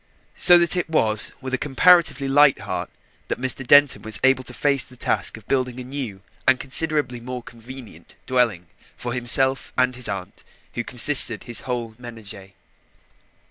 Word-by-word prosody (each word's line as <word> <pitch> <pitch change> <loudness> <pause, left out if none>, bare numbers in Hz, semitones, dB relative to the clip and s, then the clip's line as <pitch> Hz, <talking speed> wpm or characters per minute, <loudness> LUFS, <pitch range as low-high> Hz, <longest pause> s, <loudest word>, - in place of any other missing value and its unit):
So 175 -1 +7
that 170 0 +3
it 180 -2 -3
was 110 -9 +1
with 130 0 -8
a 130 - -1
comparatively 150 -1 +2
light 140 0 +3
heart - - -6 0.4
that - - -5
Mr. 130 +1 -1
Denton 145 0 +4
was 110 -1 +2
able 130 0 +2
to - - -7
face 140 -3 +1
the 125 - -10
task - - -2
of 110 - -18
building 130 -2 -3
a - - -7
new 125 -7 -7 0.3
and 130 -1 +3
considerably 145 -3 0
more 125 +1 -8
convenient 120 +1 -14
dwelling 120 -9 0 0.3
for 120 0 -6
himself 130 +2 +3
and 125 0 0
his 125 -3 -1
aunt 100 -1 -8 0.3
who 120 - -5
constituted 125 -2 +3
his 120 -2 +1
whole 120 -3 -5
ménage. 105 -5 -8
125 Hz, 165 wpm, -21 LUFS, 115-135 Hz, 0.4 s, So